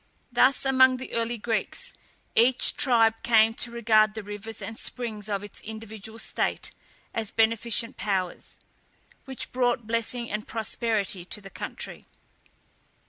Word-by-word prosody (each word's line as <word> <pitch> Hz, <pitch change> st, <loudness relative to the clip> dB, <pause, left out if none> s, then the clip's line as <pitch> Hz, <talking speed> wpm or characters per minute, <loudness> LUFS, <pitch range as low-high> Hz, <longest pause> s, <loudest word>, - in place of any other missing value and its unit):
Thus 255 Hz, +3 st, +4 dB
among 260 Hz, -1 st, +5 dB
the 260 Hz, -, -8 dB
early 230 Hz, +1 st, 0 dB
Greeks, 225 Hz, 0 st, -2 dB, 0.4 s
each 245 Hz, +2 st, +4 dB
tribe 230 Hz, -5 st, +4 dB
came 225 Hz, -1 st, +5 dB
to 235 Hz, -, 0 dB
regard 215 Hz, -2 st, +3 dB
the 220 Hz, -, -5 dB
rivers 210 Hz, +2 st, -7 dB
and 225 Hz, -, -6 dB
springs 220 Hz, -3 st, -4 dB
of 200 Hz, -1 st, -1 dB
its 205 Hz, -, -10 dB
individual 220 Hz, 0 st, -8 dB
state -, -, -2 dB, 0.4 s
as 220 Hz, -2 st, -1 dB
beneficent 230 Hz, +1 st, +1 dB
powers, 190 Hz, -4 st, -2 dB, 0.7 s
which 265 Hz, -1 st, -6 dB
brought 245 Hz, -2 st, +1 dB
blessing 230 Hz, +2 st, -1 dB
and 210 Hz, +1 st, -3 dB
prosperity 220 Hz, -4 st, -1 dB
to 200 Hz, -, -3 dB
the 195 Hz, -1 st, -12 dB
country. -, -, -7 dB
225 Hz, 135 wpm, -27 LUFS, 215-240 Hz, 0.7 s, among